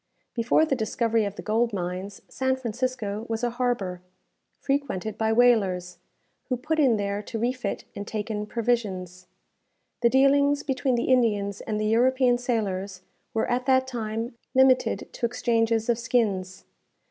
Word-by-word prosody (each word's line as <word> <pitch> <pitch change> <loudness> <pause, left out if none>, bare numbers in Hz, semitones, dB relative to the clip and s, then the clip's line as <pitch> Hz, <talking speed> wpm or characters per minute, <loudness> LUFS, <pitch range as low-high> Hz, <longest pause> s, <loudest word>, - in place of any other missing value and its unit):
Before 240 +6 +3
the 280 - 0
discovery 225 -1 0
of 200 -1 -4
the - - -8
gold 225 +1 +1
mines, 185 +1 -4
San 260 0 0
Francisco 235 -3 -3
was 225 +1 -2
a 240 - +1
harbour 235 -8 -2 0.6
frequented 270 -8 -2
by 220 0 0
whalers, 195 -7 +2 0.5
who 250 - 0
put 310 +5 -1
in 255 -7 +4
there 200 0 -2
to 225 - -6
refit 240 -2 -2
and 200 +1 -6
take 220 +1 -4
in 210 0 -3
provisions. 195 -7 -2 0.7
The 235 - +5
dealings 280 +2 +4
between 265 -2 0
the 235 - 0
Indians 205 -5 +1
and 215 -1 -3
the 215 - -1
European 245 +2 +3
sailors 200 -6 -2 0.3
were 225 - +1
at 250 +2 -1
that 260 -1 +4
time 230 -2 -4 0.2
limited 260 -1 +3
to 235 - -1
exchanges 230 -1 +1
of 235 -1 +1
skins. 210 -7 -1
230 Hz, 150 wpm, -26 LUFS, 205-250 Hz, 0.7 s, The